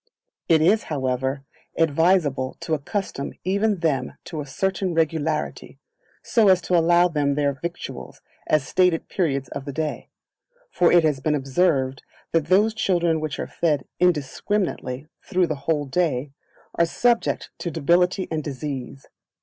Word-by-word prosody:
It 160 Hz, -2 st, +5 dB
is, 210 Hz, +6 st, +3 dB
however, 130 Hz, -1 st, -2 dB, 0.3 s
advisable 160 Hz, -4 st, +2 dB
to 160 Hz, -, -2 dB
accustom 150 Hz, -1 st, -3 dB
even 200 Hz, 0 st, +1 dB
them 135 Hz, -6 st, 0 dB
to 155 Hz, -3 st, -5 dB
a 145 Hz, -, -8 dB
certain 190 Hz, +4 st, -1 dB
regularity, 160 Hz, -1 st, -1 dB, 0.5 s
so 225 Hz, -3 st, +3 dB
as 185 Hz, -1 st, +6 dB
to 180 Hz, -, +1 dB
allow 175 Hz, +1 st, +5 dB
them 145 Hz, -4 st, 0 dB
their 145 Hz, -1 st, +1 dB
victuals 170 Hz, +5 st, -7 dB, 0.3 s
at 155 Hz, -2 st, +3 dB
stated 180 Hz, +3 st, +1 dB
periods 140 Hz, -8 st, -1 dB
of 135 Hz, -, -6 dB
the 140 Hz, -, -4 dB
day; 155 Hz, +2 st, -4 dB, 0.6 s
for 175 Hz, -, +3 dB
it 175 Hz, -1 st, +6 dB
has 150 Hz, -4 st, +1 dB
been 150 Hz, +2 st, 0 dB
observed 135 Hz, -2 st, +1 dB, 0.3 s
that 165 Hz, -2 st, +1 dB
those 205 Hz, +5 st, +4 dB
children 175 Hz, -6 st, +1 dB
which 155 Hz, -2 st, -4 dB
are -, -, -3 dB
fed 150 Hz, -5 st, -1 dB
indiscriminately 155 Hz, -4 st, -1 dB, 0.2 s
through 180 Hz, 0 st, +1 dB
the 160 Hz, -, -2 dB, 0.2 s
whole 150 Hz, -3 st, +1 dB
day, 140 Hz, -3 st, -1 dB, 0.4 s
are 170 Hz, -, +3 dB
subject 240 Hz, +6 st, +1 dB
to 175 Hz, -, -3 dB
debility 175 Hz, +4 st, +2 dB
and 155 Hz, -1 st, -2 dB
disease. 135 Hz, -2 st, -6 dB
160 Hz, 145 wpm, -23 LUFS, 140-180 Hz, 0.6 s, as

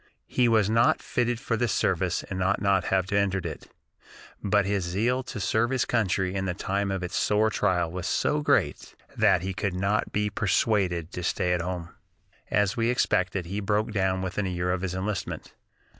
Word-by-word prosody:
He 125 Hz, -1 st, +2 dB
was 110 Hz, -3 st, +3 dB
not 115 Hz, +2 st, +3 dB
fitted 120 Hz, -1 st, -1 dB
for 115 Hz, -, -1 dB
the 120 Hz, +2 st, 0 dB
service -, -, 0 dB
and 95 Hz, -1 st, -5 dB
ought 95 Hz, +2 st, +1 dB
not 100 Hz, -2 st, +3 dB
to -, -, -4 dB
have 95 Hz, -1 st, 0 dB
entered 100 Hz, -2 st, +1 dB
it, -, -, -6 dB, 0.7 s
but 100 Hz, -1 st, +2 dB
his 100 Hz, -1 st, 0 dB
zeal 110 Hz, +9 st, 0 dB
to 105 Hz, -, -6 dB
serve 110 Hz, +4 st, +1 dB
his 130 Hz, -2 st, +1 dB
country 95 Hz, -5 st, 0 dB
in 95 Hz, -1 st, -2 dB
the 90 Hz, -2 st, -2 dB
time 100 Hz, +1 st, -1 dB
of 95 Hz, -1 st, -2 dB
its 90 Hz, -, -4 dB
sore 110 Hz, +1 st, +2 dB
trial 90 Hz, -5 st, +1 dB
was 90 Hz, +1 st, -4 dB
so 150 Hz, +8 st, +1 dB
great -, -, 0 dB, 0.2 s
that -, -, +3 dB
he 95 Hz, 0 st, -2 dB
could 95 Hz, -1 st, -2 dB
not 100 Hz, +3 st, 0 dB
be 105 Hz, 0 st, 0 dB
persuaded 95 Hz, -4 st, +1 dB
to 90 Hz, -, -5 dB
stay 90 Hz, +1 st, 0 dB
at 90 Hz, -, 0 dB
home. 85 Hz, -1 st, -4 dB, 0.6 s
As 100 Hz, -1 st, +2 dB
we 115 Hz, 0 st, +1 dB
expected, 95 Hz, -7 st, +1 dB
he 100 Hz, +5 st, -4 dB
broke 105 Hz, +2 st, 0 dB
down 95 Hz, -2 st, 0 dB
within 95 Hz, +2 st, -2 dB
a -, -, -2 dB
year 90 Hz, 0 st, -1 dB
of 90 Hz, 0 st, -1 dB
his 95 Hz, -1 st, -3 dB
enlistment. 100 Hz, +2 st, -4 dB
95 Hz, 200 wpm, -26 LUFS, 90-105 Hz, 0.7 s, was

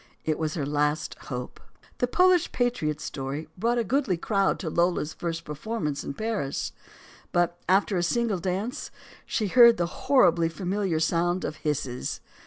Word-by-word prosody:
It 155 Hz, -1 st, 0 dB
was 155 Hz, -1 st, -1 dB
her 150 Hz, -5 st, -1 dB
last 150 Hz, +1 st, 0 dB, 0.2 s
hope. 125 Hz, -2 st, -5 dB, 0.4 s
The 245 Hz, -, +2 dB
"Polish 365 Hz, +5 st, +4 dB
patriot" 200 Hz, -, 0 dB
story 140 Hz, +1 st, -5 dB
brought 235 Hz, +5 st, +1 dB
a 235 Hz, -, +2 dB
goodly 240 Hz, -7 st, +1 dB
crowd 195 Hz, +2 st, +1 dB
to 165 Hz, -, -4 dB
Lola's 170 Hz, -2 st, +1 dB
first 165 Hz, -1 st, -4 dB
performance 150 Hz, -1 st, -3 dB
in 140 Hz, -, -5 dB
Paris. 215 Hz, -11 st, -2 dB, 0.6 s
But, 175 Hz, 0 st, +2 dB
after 195 Hz, +1 st, +3 dB
a -, -, +1 dB
single 215 Hz, +2 st, +1 dB
dance, 190 Hz, +7 st, -3 dB, 0.4 s
she 220 Hz, -, 0 dB
heard 235 Hz, +1 st, +8 dB
the 175 Hz, -, +1 dB, 0.2 s
horribly 175 Hz, -11 st, +5 dB
familiar 185 Hz, -1 st, -1 dB
sound 175 Hz, +3 st, +1 dB
of 155 Hz, -, -4 dB
hisses. 140 Hz, -5 st, -2 dB
175 Hz, 155 wpm, -26 LUFS, 150-220 Hz, 0.6 s, heard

